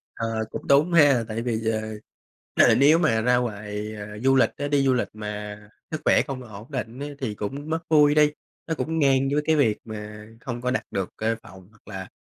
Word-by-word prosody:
Ờ, 115 -1 -2
cũng - - -7
đúng 150 +5 +4
ha. 145 -7 +5
Tại 110 +1 -3
vì, 115 -2 -2
ờ, 110 0 -1 0.9
ờ, - - +5
nếu 150 +5 +5
mà 115 -10 +2
ra 125 +1 +3
ngoài, 105 -2 -4
ờ, 105 0 -8
du 135 0 +4
lịch 130 - +4
á 145 - -2
đi 140 -1 +2
du 130 - +4
lịch 125 - 0
mà 105 -1 -6 0.3
sức 155 - -4
khỏe - - +5
không 135 -2 -5
ổn 110 +4 -11
định 125 -1 -5
á, 145 - -4
thì 110 -6 -3
cũng 140 +10 -5
mất 160 +1 0
vui 150 -1 +5
đi, 150 -1 +5 0.4
nó 160 - -1
cũng 160 +1 -2
ngang 135 -1 +3
với 150 - +2
cái 160 - +3
việc 115 -8 +2
mà 105 -1 -8 0.2
không 120 -3 -5
có 125 0 -1
đặt 135 - -1
được 95 -2 -2
cái 110 +1 0
phòng 95 -1 -14
hoặc 105 -2 -27
là 95 -3 -7
120 Hz, 225 wpm, -24 LUFS, 105-145 Hz, 0.9 s, ha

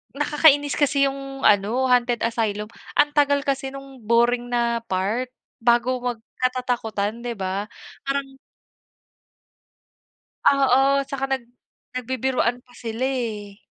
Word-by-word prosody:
nakakainis 290 -1 +3
kasi 280 -1 +3
yung 275 0 -7
ano, 215 +5 +3
Hunted 245 -1 +2
Asylum 215 -2 -1 0.3
ang 295 0 +5
tagal 285 -1 +3
kasi 270 -1 -1
nung 275 -2 -11
boring 240 +2 +2
na 235 -1 +1
part 205 +7 -1 0.3
bago 240 +2 +3
magkatatakutan, 240 -2 -2
di 240 - -2
ba, 195 +1 -2 0.4
parang 275 -1 -3 2.1
Oo, 275 0 +4
tsaka 270 0 -3
nag 265 -2 -1 0.5
nagbibiruan 255 -1 -1
pa 245 - -24
sila 230 +1 -4
eh. 220 -6 -3
250 Hz, 110 wpm, -23 LUFS, 230-270 Hz, 2.1 s, ang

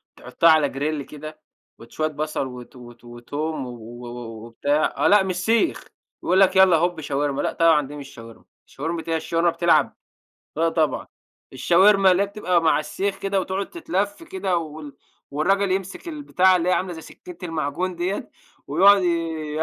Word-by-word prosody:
تحطها 165 - +2
على 155 -2 +5
grill 145 +1 -2
كده 155 +1 -9 0.4
وت 115 - -15
شوية 155 0 -1
بصل 155 -2 -3
وت 125 0 -11
وت 120 -1 -14
وتوم 135 +6 -5
و-و 120 0 -10 0.4
وبتاع، 145 +6 0
آه - - +2
لأ 205 -1 +5
مش 185 -2 -3
سيخ 225 - 0 0.4
يقول 185 +2 +2
لَك 190 -1 +4
يلّا 190 -3 +6
هوب 175 0 -1
شاورما 145 -1 -1
لأ، - - -2
طبعًا 160 -4 +3
دي 145 - -9
مش 140 -2 -9
شاورما، 115 -1 -13 0.2
شاورما 165 +4 -5
إيه 165 - -1
هي - - +2
الشاورما 165 +2 0
بتلعب؟ 165 -4 +2 0.6
لأ، 165 +1 +2
طبعًا 160 -2 0 0.5
الشاورما 195 +2 +4
اللي 185 +2 +3
هي - - 0
بتبقى 185 -4 0
م 165 - 0
علي 155 - +3
السيخ 195 +5 -3
كده 195 0 -1
وتقعد 190 +1 -4
تتلف 205 - -3
كده 330 - -2
وال 155 -3 -6 0.3
والراجل 195 +7 +1
يمسك 195 - -3
البتاعة 190 - +2
اللي 175 0 -1
هي - - +3
عاملة 185 0 -1
زي 160 - -8
سكينة 180 +2 -13
المعجون 165 +2 -3
ديَّة 180 +4 -3 0.4
ويقعد 195 +6 +5
ي - - +1 0.5
ي 160 - +1
165 Hz, 175 wpm, -23 LUFS, 145-190 Hz, 0.6 s, يلّا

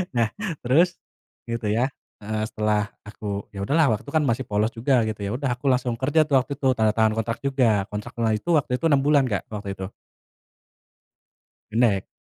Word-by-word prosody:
Nah, 115 -2 +2 0.3
terus 170 +8 +3 0.5
gitu 115 -2 -2
ya, 120 +6 +1 0.3
heeh. 110 +1 -2
Setelah 105 -1 0 0.2
aku 100 -1 -5
ya 100 - -5
udahlah 150 +6 +3
waktu 105 - -4
itu 140 - -8
kan 155 - +4
masih 130 +1 0
polos 105 +2 +1
juga 125 +1 +2
gitu, 110 -1 -4
ya 100 - -2
udah 140 -1 -2
aku 130 - -17
langsung 125 -1 +1
kerja 145 +5 +2
tuh 140 -3 +3
waktu 140 - -5
itu, 135 - 0
tanda 110 -1 +3
tangan 110 -1 +3
kontrak 115 +1 -2
juga, 120 -8 +2
kontraknya 110 +2 -2
itu 170 - -8
waktu 135 - -1
itu 165 - -3
6 140 -3 +4
bulan, 145 -2 +4
Kak, 100 -5 -2
waktu 105 -1 -5
itu. 95 0 -4 1.8
Pendek. 110 -4 +2
115 Hz, 185 wpm, -24 LUFS, 105-135 Hz, 1.8 s, kan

